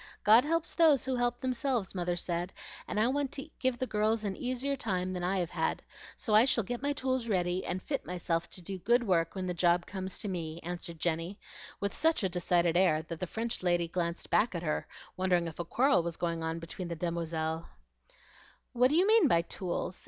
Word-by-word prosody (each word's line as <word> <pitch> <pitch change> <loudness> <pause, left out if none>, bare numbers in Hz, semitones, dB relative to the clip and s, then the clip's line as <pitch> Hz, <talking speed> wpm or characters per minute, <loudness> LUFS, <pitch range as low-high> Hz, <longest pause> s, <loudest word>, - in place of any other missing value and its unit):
God 220 +4 +7
helps 330 +2 0
those 310 -6 +4
who 265 -1 0
help 245 0 0
themselves, 255 -5 -1
mother 175 -2 -1
says, 175 0 -2 0.4
and - - -2
I 220 - +4
want 275 0 0
to 275 +2 -4
give 260 -2 +1
the 255 - -1
girls 215 -1 +1
an 200 -2 -2
easier 255 +2 -2
time 185 -7 -2
than 180 -1 -4
I 190 +2 +1
have 175 -2 -1
had; - - -1 0.3
so 215 - -2
I 215 +2 +8
shall 245 -3 +3
get 245 +5 -4
my 285 +1 0
tools 260 -4 -1
ready, 180 -3 0
and 185 - -3
fit 275 - -2
myself 175 -1 -2
to 185 - -6
do 190 +2 -5
good 240 +6 +3
work 170 -5 +1
when 190 -1 -3
the 180 - -1
job 175 0 +2
comes 190 -1 -5
to - - -4
me," 165 -4 -4
answered 175 -1 -5
Jenny, 170 +4 -1 0.4
with 200 0 -1
such 320 -7 +2
a 190 - +2
decided 175 -1 +2
air 175 -4 +3
that 165 0 -7
the 185 - -3
French 225 +4 -2
lady 175 -2 +2
glanced 170 0 -3
back 220 -3 +3
at 170 - -3
her, 155 -2 -1 0.3
wondering 180 -2 +2
if 165 -1 -7
a 175 - -2
quarrel 265 +3 +3
was 170 0 -4
going 170 -1 -2
on 160 0 -2
between 165 +2 -6
the 170 - -4
demoiselles. 165 -1 -2 1.1
"What 250 +1 +4
do 295 - +1
you 360 +3 +5
mean 435 -5 +6
by 170 -9 +4
tools?" 180 +1 -4
185 Hz, 220 wpm, -31 LUFS, 170-245 Hz, 1.1 s, I